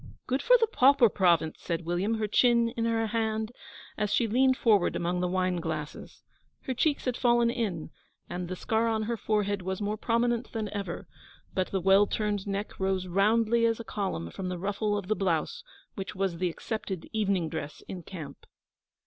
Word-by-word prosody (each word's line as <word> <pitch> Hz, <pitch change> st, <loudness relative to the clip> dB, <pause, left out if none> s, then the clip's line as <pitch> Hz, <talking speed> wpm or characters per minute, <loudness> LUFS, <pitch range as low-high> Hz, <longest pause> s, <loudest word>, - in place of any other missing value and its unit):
'Good 260 Hz, +2 st, 0 dB
for -, -, +6 dB
the 455 Hz, -, +3 dB
Pauper 275 Hz, -, +5 dB
Province!' 170 Hz, -5 st, +2 dB
said 165 Hz, -1 st, -3 dB
William, 180 Hz, +6 st, 0 dB
her 215 Hz, -1 st, -1 dB
chin 235 Hz, +2 st, +4 dB
in 230 Hz, -1 st, -2 dB
her 225 Hz, -1 st, +1 dB
hand, 220 Hz, 0 st, -1 dB, 0.5 s
as 210 Hz, -1 st, 0 dB
she 235 Hz, -, +3 dB
leaned 260 Hz, +4 st, +3 dB
forward 210 Hz, -6 st, +3 dB
among 175 Hz, +1 st, -1 dB
the 180 Hz, -, 0 dB
wine 185 Hz, 0 st, 0 dB
glasses. 155 Hz, -3 st, -5 dB, 0.4 s
Her 260 Hz, -, -3 dB
cheeks 285 Hz, +4 st, 0 dB
had 250 Hz, -2 st, 0 dB
fallen 240 Hz, -1 st, +3 dB
in, 200 Hz, -11 st, -3 dB, 0.4 s
and 180 Hz, 0 st, -4 dB
the 185 Hz, -, -4 dB
scar 220 Hz, +5 st, 0 dB
on 220 Hz, -1 st, 0 dB
her 235 Hz, +2 st, -1 dB
forehead 205 Hz, -2 st, 0 dB
was 190 Hz, +1 st, -3 dB
more 210 Hz, +1 st, -2 dB
prominent 235 Hz, +1 st, 0 dB
than 220 Hz, -3 st, -2 dB
ever, 195 Hz, -4 st, -5 dB, 0.5 s
but 185 Hz, -1 st, 0 dB
the 195 Hz, -, -1 dB
well 195 Hz, +3 st, +5 dB
turned 210 Hz, -2 st, -2 dB
neck 200 Hz, +1 st, -4 dB
rose 190 Hz, -1 st, 0 dB
roundly 220 Hz, +5 st, +2 dB
as 230 Hz, 0 st, 0 dB
a -, -, -5 dB
column 190 Hz, -, -3 dB
from 185 Hz, -1 st, -5 dB
the 180 Hz, -, -3 dB
ruffle 205 Hz, +3 st, -1 dB
of 195 Hz, -3 st, -5 dB
the 215 Hz, -, +1 dB
blouse 175 Hz, -6 st, -1 dB, 0.3 s
which 195 Hz, -1 st, -6 dB
was 185 Hz, -3 st, -1 dB
the 180 Hz, -1 st, +1 dB
accepted 190 Hz, -1 st, -5 dB
evening 200 Hz, -6 st, +1 dB
dress 155 Hz, -2 st, -6 dB
in 185 Hz, -, -6 dB
camp. 155 Hz, -6 st, -9 dB
205 Hz, 190 wpm, -28 LUFS, 180-230 Hz, 0.5 s, for